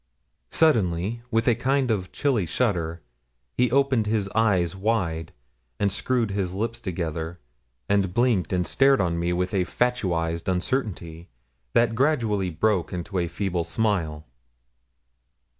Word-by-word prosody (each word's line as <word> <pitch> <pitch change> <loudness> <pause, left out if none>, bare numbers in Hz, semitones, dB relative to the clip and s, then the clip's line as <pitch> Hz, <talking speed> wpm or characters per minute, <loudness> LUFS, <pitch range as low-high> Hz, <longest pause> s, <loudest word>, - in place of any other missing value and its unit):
Suddenly, 110 - +2
with 115 -1 +1
a 120 - +6
kind 130 +2 +1
of 95 -4 -2
chilly 125 - 0
shudder, 85 -6 -1 0.5
he 125 0 +2
opened 130 -3 +2
his 105 -2 0
eyes 95 -6 +1
wide, 95 -6 -1 0.5
and 100 -1 +2
screwed 120 0 0
his 95 -2 -2
lips 115 +3 -3
together, 85 -3 -4 0.5
and 100 -2 +2
blinked 120 -3 +1
and 90 -1 +1
stared 135 - +4
on 85 -3 0
me 85 +1 0
with 90 +2 -1
a 95 -2 +2
fatuised 90 -8 -1
uncertainty, 90 -5 -2 0.5
that 115 -1 +3
gradually 115 -8 +1
broke 95 +2 0
into 90 +2 -3
a 85 - 0
feeble 90 0 -2
smile. 85 -5 -1
100 Hz, 130 wpm, -25 LUFS, 85-115 Hz, 0.5 s, a